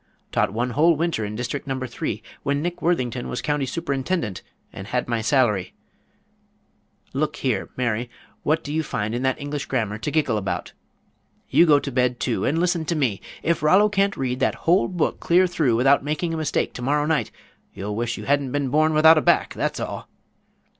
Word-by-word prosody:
Taught - - +1
one 120 +4 -1
whole 160 +6 +4
winter 165 -7 -1
in 105 0 -4
district 125 +5 -4
number 130 -1 -2
three 110 -3 -4 0.2
when 140 0 0
Nick 175 +3 -3
Worthington 130 -8 -1
was 125 - -3
county 145 -2 -1
superintendent, 140 - -2 0.3
and 95 - -8
had 125 +2 -1
my 115 -1 -1
salary 110 -6 +1 1.4
look 150 +2 -1
here, 125 -8 -1
Mary, 120 -1 -1 0.3
what 155 +2 +1
do 145 - -5
you 160 - +1
find 110 -7 -3
in 120 - -2
that 130 0 0
English 145 0 -4
grammar 110 -5 -1
to 130 - -3
giggle 145 -7 +1
about? 95 - -4 0.8
You 170 - +5
go 150 -2 +7
to 140 0 -3
bed, 125 -1 +1
too, 120 - -1
and 155 - +1
listen 175 -1 +1
to 170 - -1
me 120 - 0 0.2
if 170 +1 +1
Rollo 190 +7 +5
can't 200 -1 +1
read 125 -1 -2
that - - +1
whole 175 +4 +4
book 180 -3 -1
clear 180 +2 +4
through 155 -9 +1
without 135 +4 +4
making 155 +3 -2
a - - -2
mistake 155 -3 -1
to - - -7
morrow 145 +4 +1
night, 155 -1 0 0.5
you'll 105 +1 -4
wish 120 +1 -2
you - - -7
had 140 -2 +1
been 140 -1 -1
born 155 +3 +2
without 160 +1 +7
a - - -2
back, - - +2
that's - - -2
all." - - -5
140 Hz, 195 wpm, -23 LUFS, 120-160 Hz, 1.4 s, go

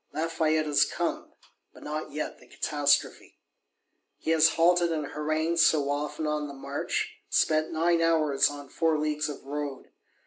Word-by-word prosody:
Lafayette 160 -1 0
is 150 -1 +4
come, - - -3 0.4
but - - -14
not 155 +1 -4
yet 155 - -5
the - - -19
catastrophe. 145 -1 0 0.8
He 160 - -2
has 160 0 +5
halted 175 +1 +3
and 155 -2 -2
harangued 155 +2 -1
so 150 -3 +4
often, 150 +2 -3
on 150 -1 -1
the 140 - -9
march; 425 - -3
spent 155 - +2
nine 165 +1 +2
hours 155 -4 +3
on 145 -1 -9
four 160 -2 +1
leagues 150 0 -1
of 145 - -8
road. 145 -1 -5
155 Hz, 150 wpm, -27 LUFS, 145-165 Hz, 0.8 s, has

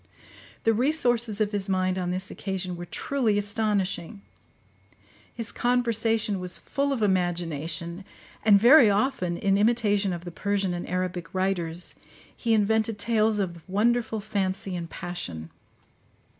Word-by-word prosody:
The 225 - +4
resources 240 -4 +1
of 210 -1 +1
his 200 -1 -3
mind 185 0 +1
on 180 -1 -2
this 185 +1 -3
occasion 190 -2 -4
were 175 0 -7
truly 240 -4 0
astonishing: 205 -1 -1 1.1
his 230 -2 -4
conversation 225 -4 +1
was 180 -1 -2
full 280 0 -2
of 250 -6 -1
imagination; 170 -2 -1 0.4
and 205 -2 +6
very 240 +1 +8
often, 200 -5 0
in 195 +1 +2
imitation 210 -3 +2
of 175 0 -5
the 175 - -6
Persian 200 +1 -1
and 175 - -5
Arabic 180 -1 -3
writers, 180 -3 -1 0.4
he 230 -2 +1
invented 220 +1 +1
tales 220 0 +2
of 175 -4 -2
wonderful 225 +2 +1
fancy 195 -2 -2
and 170 -1 -5
passion. 85 - -6
200 Hz, 130 wpm, -26 LUFS, 180-225 Hz, 1.1 s, very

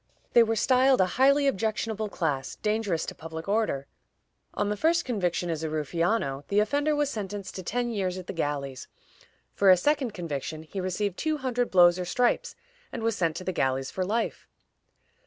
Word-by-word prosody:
They 240 - +8
were 225 0 +2
styled 260 +3 +4
a 185 - +5 0.2
highly 280 +1 +5
objectionable 220 -2 -1
class, 145 -8 -2
dangerous 210 -6 -1
to - - -5
public 160 +1 -8
order. 200 -10 0 0.7
On 205 - 0
the 210 - 0
first 335 +9 +2
conviction 180 -7 -1
as 160 -1 -3
a 160 - -1
ruffiano, 155 -1 -1
the 200 - +2
offender 285 +8 +1
was 290 -1 0
sentenced 205 -2 -5
to 185 - -6
ten 240 +6 -2
years 190 -4 -2
at 185 - -7
the - - -6
galleys; 140 -5 -3 0.7
for 200 - +4
a 185 - +8
second 265 - 0
conviction, 155 -3 -4
he 190 +5 -5
received 185 +1 -2
two 310 -1 0
hundred 250 -3 -1
blows 175 -1 +6
or 180 - -2
stripes, 245 +7 0 0.4
and 230 - -5
was 225 -1 +1
sent 165 -3 0
to 185 - -5
the 185 - -2
galleys 135 -2 0
for 185 - -2
life. 220 +5 -2
200 Hz, 185 wpm, -27 LUFS, 165-230 Hz, 0.7 s, They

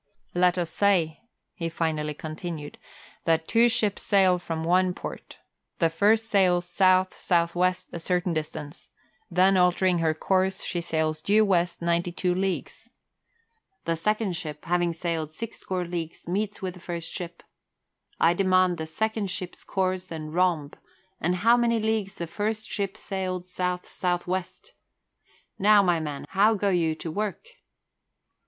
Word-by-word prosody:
"Let 180 0 +3
us 175 -2 -1
say," 180 -6 +2 0.3
he 165 -3 -3
finally 155 -2 -2
continued, 155 -1 -6 0.5
"that 165 -1 +2
two 235 +1 +5
ships 215 -4 0
sail 190 -3 +4
from 165 -2 -4
one 180 +2 +2
port. - - -8 0.4
The 165 -2 +2
first 215 +6 +3
sails 180 -4 +2
south 185 +1 +3
south 170 -2 +1
west 180 +1 0
a 170 - -4
certain 180 +1 0
distance; 155 0 -5 0.4
then 185 +2 +4
altering 180 0 +3
her 160 -1 +1
course, 190 +3 0
she 175 - -2
sails 160 -2 -1
due 215 +5 +4
west 175 -3 +1
ninety 170 +1 +1
two 180 +1 0
leagues. 190 0 -3 1.0
The 165 - +1
second 210 +2 0
ship, 150 -2 -6
having 175 0 +1
sailed 165 -2 -3
six 230 +8 -7
score 185 -1 -3
leagues, 170 -2 -5
meets 200 +3 -2
with 185 -1 -2
the 180 - -13
first 170 -1 -5
ship. 175 -2 -7 0.8
I 170 - +5
demand 185 -2 +3
the 160 - -4
second 220 +4 -1
ship's 180 0 -6
course 185 -1 -1
and 155 -2 -6
rhomb, 170 -5 +1 0.5
and 175 +2 +1
how 235 +1 +7
many 235 -1 +2
leagues 215 -2 -1
the 170 - -4
first 215 +6 -3
ship 200 0 -3
sailed 185 -3 -3
south 180 0 -2
south 175 -1 -2
west. 185 - -4 0.9
Now, 205 0 +6
my 175 -3 +2
man, 150 -3 -5
how 210 +3 +4
go 200 0 +1
you 165 -4 +1
to 160 0 -6
work?" 210 - -3
180 Hz, 155 wpm, -26 LUFS, 165-195 Hz, 1.0 s, how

